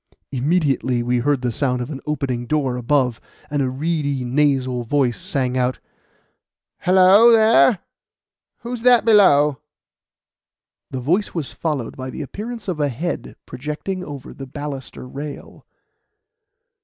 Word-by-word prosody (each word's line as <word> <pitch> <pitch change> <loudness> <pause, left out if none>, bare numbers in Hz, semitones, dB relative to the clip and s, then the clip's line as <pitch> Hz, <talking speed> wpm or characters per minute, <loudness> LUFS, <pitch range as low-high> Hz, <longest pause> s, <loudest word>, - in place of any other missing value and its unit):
Immediately 135 -3 0
we 120 +1 +1
heard 135 +1 0
the 125 - 0
sound 125 +1 0
of 125 +4 -5
an 140 - -6
opening 130 -5 -2
door 140 -4 0
above, 125 -1 0 0.3
and 145 -1 0
a 130 - 0
reedy, 145 -1 -2
nasal 130 -1 +1
voice 125 -1 0
sang 130 -2 -1
out: 125 0 0 1.0
"Hello, 190 +5 +6
there! 225 0 +5 0.8
Who's 240 0 -5
that 245 -2 +5
below?" 150 - +5 1.3
The 130 - -5
voice 180 - 0
was 160 -6 -3
followed 150 -8 -3
by 130 0 -5
the 150 - -6
appearance 225 - -7
of 175 -5 -3
a 145 -1 +1
head 160 +8 -4
projecting 150 +8 -5
over 140 -5 -8
the 135 - -9
baluster 140 -2 -7
rail. 140 +3 -9
145 Hz, 130 wpm, -21 LUFS, 130-170 Hz, 1.3 s, Hello